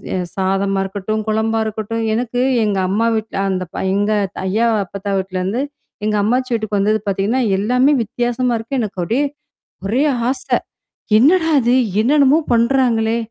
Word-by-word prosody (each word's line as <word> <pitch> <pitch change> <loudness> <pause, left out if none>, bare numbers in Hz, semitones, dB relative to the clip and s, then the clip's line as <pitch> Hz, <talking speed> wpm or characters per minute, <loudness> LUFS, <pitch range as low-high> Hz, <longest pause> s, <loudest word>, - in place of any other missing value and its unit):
எ - - 0 0.2
சாதமா 195 +1 0
இருக்கட்டும், 205 +2 -3
குழம்பா 220 +1 0
இருக்கட்டும். 220 +1 -3
எனக்கு 245 +1 -2 0.2
எங்க 205 -2 0
அம்மா 225 +4 +1
வீட்ல 220 -2 -4
அந்த 185 -1 -1
பய 190 - -1
எங்க 205 +1 +1 0.3
ஐயா, 220 +5 +1 0.2
அப்பத்தா 200 +2 -5
வீட்லேருந்து, 190 +5 -2 0.4
எங்க 215 0 +1
அம்மாச்சி 250 +4 0
வீட்டுக்கு 215 -3 -1
வந்தது 215 +2 +2
பார்த்தீங்கன்னா, 200 +6 0 0.2
எல்லாமே 250 +8 +3
வித்தியாசமா 240 +2 -1
இருக்கு. 255 +4 -3
எனக்கு 195 -4 -4
அப்டியே 245 +10 0 0.6
ஒரே 245 +8 +1 0.3
ஆசை, 330 +10 0 0.6
"என்னடா 325 +4 +4
இது? 240 +1 +2 0.3
என்னன்னமோ 280 +4 +4
பண்றாங்களே? 235 -2 +2
220 Hz, 140 wpm, -18 LUFS, 200-245 Hz, 0.6 s, என்னடா